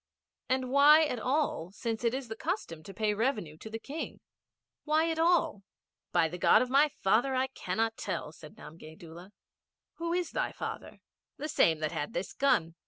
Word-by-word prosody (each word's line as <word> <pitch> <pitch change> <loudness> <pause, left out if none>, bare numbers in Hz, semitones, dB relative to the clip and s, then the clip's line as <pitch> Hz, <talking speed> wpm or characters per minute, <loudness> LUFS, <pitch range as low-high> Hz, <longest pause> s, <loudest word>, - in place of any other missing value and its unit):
'And 255 -1 0
why 295 +3 +7
at 250 -5 -3
all, 255 - -1
since 225 0 -4
it 235 +1 +1
is 265 -2 -5
the 225 - -6
custom 320 - -4
to 200 - -8
pay 210 +2 0
revenue 210 - -1
to 220 - -10
the 225 - -5
King? 285 +7 -6 0.6
Why 315 +2 +2
at 320 - -3
all?' 330 - +2 0.5
'By 170 -2 +3
the 175 +3 -7
God 220 - +5
of 250 - -6
my 285 +3 +5
father 255 +3 +1
I 255 +1 +2
cannot 225 -3 -2
tell,' - - -4
said 155 -1 -14
Namgay 155 0 -12
Doola. 170 +1 -11
'And 195 - -20 0.7
who 335 0 -3
was 350 -1 -1
thy - - -2
father?' - - -7 0.4
'The 300 - -5
same 165 - +3
that 155 - -1
had 145 - -4
this 175 - -4
gun.' 170 -12 +2
235 Hz, 190 wpm, -30 LUFS, 180-295 Hz, 0.7 s, why